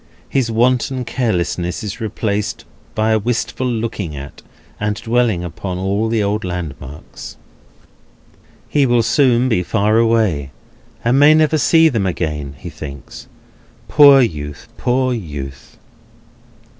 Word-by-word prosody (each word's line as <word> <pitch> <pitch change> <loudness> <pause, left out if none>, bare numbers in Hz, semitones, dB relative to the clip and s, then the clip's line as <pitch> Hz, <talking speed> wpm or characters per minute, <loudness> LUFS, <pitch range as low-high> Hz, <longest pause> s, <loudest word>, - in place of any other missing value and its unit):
His 130 -4 0
wonted 125 +2 +1
carelessness 90 -5 -2
is 105 +3 -6
replaced 105 -1 -3 0.3
by 110 +1 +1
a 110 - +3
wistful 120 +3 -2
looking 110 -9 -3
at, 70 +1 -9 0.4
and 105 0 -1
dwelling 115 -5 0
upon, 90 +2 -5
all 100 +4 -1
the 110 -2 +1
old 105 +2 -1
landmarks. 80 -5 -7 1.3
He 140 -2 +2
will 120 -1 +3
soon 125 +1 +3
be 110 -8 +1
far 105 +3 +1
away, 110 -12 +1 0.6
and 125 +3 +3
may 150 +2 +7
never 155 0 +3
see 165 +4 +5
them 110 -10 0
again, 75 -5 -3
he 85 +4 -9
thinks. 70 -5 -10 0.6
Poor 140 -2 +7
youth! 75 - -3
Poor 130 +1 0
youth! 70 - -7
110 Hz, 125 wpm, -18 LUFS, 90-125 Hz, 1.3 s, may